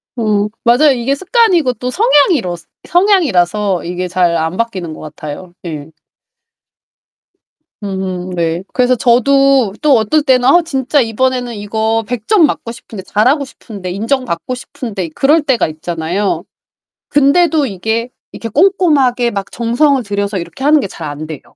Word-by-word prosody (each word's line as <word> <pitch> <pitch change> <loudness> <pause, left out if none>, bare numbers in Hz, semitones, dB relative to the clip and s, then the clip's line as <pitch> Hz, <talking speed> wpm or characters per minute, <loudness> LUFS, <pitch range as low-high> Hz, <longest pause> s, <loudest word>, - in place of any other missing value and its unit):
어 210 -3 0 0.2
맞아요. 260 +5 +5
이게 260 +2 0
습관이고 365 - +2
또 250 +1 -5
성향이러 290 - +2 0.3
성향이라서 210 - +2
이게 180 +1 -3
잘 175 -1 +1
안 160 +3 -2
바뀌는 190 -8 -3
것 - - -11
같아요. 155 +3 -8
예. 155 -3 -6 1.9
음 190 -2 -4
네. 170 0 -2
그래서 250 0 +2
저도 255 -1 +3
또 290 -5 +4
어떨 220 +8 +2
땐 260 -4 +3
아 345 +7 +6
진짜 275 -1 0
이번에는 245 +1 -1
이거 220 +2 -1
100 240 -2 -5
점 400 -7 +5
맞고 240 -5 -3
싶은데 220 -4 -10
잘하고 255 +10 +1
싶은데 200 -8 -9
인정받고 235 +1 -2
싶은데 230 - -6
그럴 300 +4 +3
때가 265 -5 +1
있잖아요. 165 +5 -3 0.7
근데도 295 +2 +3
이게 220 +4 -2 0.2
이렇게 230 - -7
꼼꼼하게 275 - +2
막 200 -2 -5
정성을 255 +4 +1
들여서 200 -1 -2
이렇게 180 +9 -8
하는 300 +1 +5
게 260 - -2
잘 165 -4 -8
안 145 +2 -6
돼요. 155 -4 -7
230 Hz, 300 characters per minute, -15 LUFS, 185-275 Hz, 1.9 s, 아